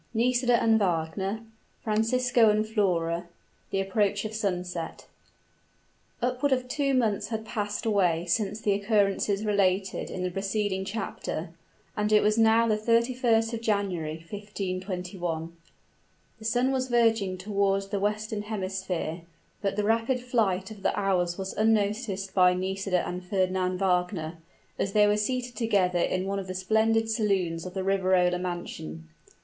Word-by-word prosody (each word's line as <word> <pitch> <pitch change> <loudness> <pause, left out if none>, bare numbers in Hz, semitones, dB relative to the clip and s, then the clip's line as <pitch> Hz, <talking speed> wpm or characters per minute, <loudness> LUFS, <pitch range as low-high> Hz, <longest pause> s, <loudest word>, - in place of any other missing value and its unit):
NISIDA 245 +1 +3
AND 225 -1 +4
WAGNER 190 +3 -1 0.4
FRANCISCO 230 +2 +3
AND 215 +1 +2
FLORA 175 -6 0 0.4
THE 195 - 0
APPROACH 200 +1 0
OF 215 - -4
SUNSET. 180 -5 -3 1.2
Upward 255 +3 +1
of 255 -1 +1
two 275 0 0
months 220 -5 +1
had 220 -1 -4
passed 210 -1 -3
away 180 -6 +2
since 205 +3 0
the 215 -2 +1
occurrences 200 0 +1
related 195 -2 +1
in 185 - -4
the 180 - -1
preceding 195 0 -1
chapter, 220 +3 -4 0.5
and 210 0 0
it 210 - +5
was 210 0 +3
now 225 +1 +5
the 215 -1 +1
31st 230 0 +2
of 230 - -3
January, 195 -8 -1
1521. 185 -4 -4 0.8
The 220 - -11
sun 245 +4 +2
was 260 -1 0
verging 225 -6 +2
toward 195 0 0
the 200 - 0
western 210 +1 -1
hemisphere, 190 -5 -3 0.4
but 195 -1 -1
the 210 - 0
rapid 225 +4 +1
flight 225 -6 0
of 210 -2 -10
the - - 0
hours 180 -3 +1
was 190 -1 -4
unnoticed 205 -2 0
by 180 -1 +5
Nisida 190 0 -1
and 180 +1 -5
Fernand 185 -1 0
Wagner, 180 -3 0 0.4
as 195 - -1
they 210 -1 +6
were 205 0 +3
seated 245 +3 -2
together 195 -6 +1
in 185 +2 0
one 200 0 -1
of 190 - -6
the 185 - -5
splendid 220 +4 +2
saloons 190 -7 0
of 180 - -9
the 190 - -1
Riverola 185 -2 +2
mansion. 125 - -5
200 Hz, 145 wpm, -27 LUFS, 185-220 Hz, 1.2 s, they